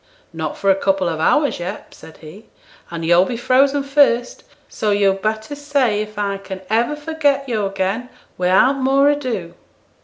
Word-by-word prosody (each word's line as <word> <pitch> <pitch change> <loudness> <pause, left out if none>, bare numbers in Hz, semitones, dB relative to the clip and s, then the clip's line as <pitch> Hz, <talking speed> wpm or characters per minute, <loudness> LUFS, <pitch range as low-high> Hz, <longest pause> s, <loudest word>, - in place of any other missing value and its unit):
'Not 160 -2 -4
for 195 - +2
a - - +3
couple 195 -1 0
of 160 -2 -3
hours 290 - +2
yet,' 180 +4 -7
said 160 - -14
he; 170 +8 -13 0.4
'and 165 -1 -5
yo'll 175 +2 +5
be 235 +5 -4
frozen 270 +3 +2
first; 275 -4 +1 0.2
so 215 - -3
yo'd 200 -1 +2
better 220 +5 -3
say 280 -7 0
if 215 0 -8
I 200 -1 -1
can 190 -1 -8
ever 235 +6 +1
forget 295 -2 -1
yo' 215 -5 -1
again, 195 +5 -3 0.3
without 190 +10 +3
more 275 +2 +3
ado.' 235 -12 -4
215 Hz, 165 wpm, -19 LUFS, 190-275 Hz, 0.4 s, yo'll